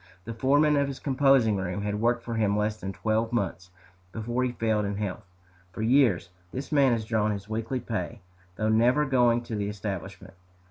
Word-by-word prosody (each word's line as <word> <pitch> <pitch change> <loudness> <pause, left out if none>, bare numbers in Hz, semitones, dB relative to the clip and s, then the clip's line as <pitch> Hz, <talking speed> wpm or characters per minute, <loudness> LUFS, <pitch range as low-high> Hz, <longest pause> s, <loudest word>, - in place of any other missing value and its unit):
The 115 - -5
foreman 145 +5 +3
of 140 0 +2
his 135 -1 -5
composing 135 -6 +3
room 95 +1 -3
had 105 0 -2
worked 120 +1 +1
for 115 - -5
him 105 -2 +1
less 105 +1 0
than 95 -3 -6
twelve 110 +3 -1
months 95 -5 -2 0.4
before 120 +4 -2
he 125 - 0
failed 110 -3 0
in 100 0 -2
health. 100 -1 -4 0.5
For 110 - -4
years 115 -8 +3 0.2
this 135 +4 -6
man 140 -4 +4
has 110 -2 -2
drawn 110 -1 +1
his 100 -1 -4
weekly 115 +4 -3
pay, 115 -1 -4 0.3
though 110 - -1
never 120 +7 +3
going 120 -3 +3
to 115 -1 -5
the 100 -1 -2
establishment. 95 -2 -6
110 Hz, 190 wpm, -27 LUFS, 105-125 Hz, 0.5 s, man